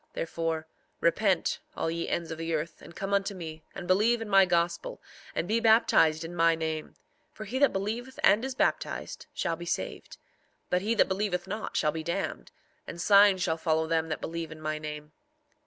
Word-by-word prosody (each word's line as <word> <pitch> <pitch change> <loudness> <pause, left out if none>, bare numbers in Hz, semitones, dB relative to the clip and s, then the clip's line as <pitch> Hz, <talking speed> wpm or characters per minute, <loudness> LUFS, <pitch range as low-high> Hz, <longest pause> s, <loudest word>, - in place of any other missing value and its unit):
4:18 - - -38
Therefore, 165 -1 -2 0.3
repent 185 +2 +2 0.2
all 165 - -1
ye 170 0 -3
ends 170 -1 -2
of 160 - -5
the 165 0 -1
earth, 155 +1 -4
and 170 - -13
come 195 +1 -3
unto 200 0 +1
me, 160 -3 -7
and 190 - -6
believe 215 +6 +3
in 225 - -5
my 195 -2 +6
gospel, 170 -1 0 0.4
and 170 - -1
be 220 +3 +2
baptized 220 -8 +4
in 170 +2 -7
my 165 -1 +4
name; 160 -1 -4 0.4
for 215 - -9
he 255 +5 -3
that 285 - +5
believeth 225 +7 -4
and 210 +4 +5
is 265 -1 -3
baptized - - -1
shall 165 - -1
be 175 +1 -9
saved; - - -4 0.5
but 180 - +2
he 220 +4 0
that - - +4
believeth 190 -2 -1
not 210 +3 -4
shall 150 - +2
be 160 +1 -4
damned; 170 +4 -3 0.4
and 170 - -7
signs 200 0 +6
shall 160 -3 0
follow 160 -1 +1
them 160 0 0
that 155 - -3
believe 165 -1 -4
in 155 - -9
my 155 0 -3
name. 150 0 -7
170 Hz, 200 wpm, -29 LUFS, 160-200 Hz, 0.5 s, my